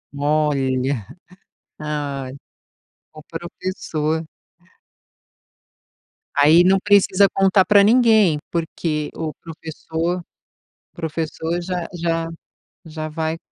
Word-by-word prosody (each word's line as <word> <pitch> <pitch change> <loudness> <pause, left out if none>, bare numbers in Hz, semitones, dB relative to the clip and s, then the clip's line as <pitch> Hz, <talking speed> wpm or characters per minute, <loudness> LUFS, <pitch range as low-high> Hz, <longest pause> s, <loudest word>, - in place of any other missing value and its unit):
Olha. 140 -5 0 0.7
Ai, 145 -3 -4 0.8
o 155 - -11
professor. 165 -2 -3 2.1
Aí 155 +4 +6
não 190 +2 +4
precisa 200 -1 +4
contar 195 0 +4
pra 205 -1 +6
ninguém, 220 -7 +5
porque 160 -2 -2
o 160 -2 -4
professor 165 +2 -4 0.7
professor 165 +1 -3
já 180 -1 -3
já 165 -1 -1 0.6
já 155 -1 -5
vai 160 +1 -3
165 Hz, 80 wpm, -21 LUFS, 150-180 Hz, 2.1 s, Aí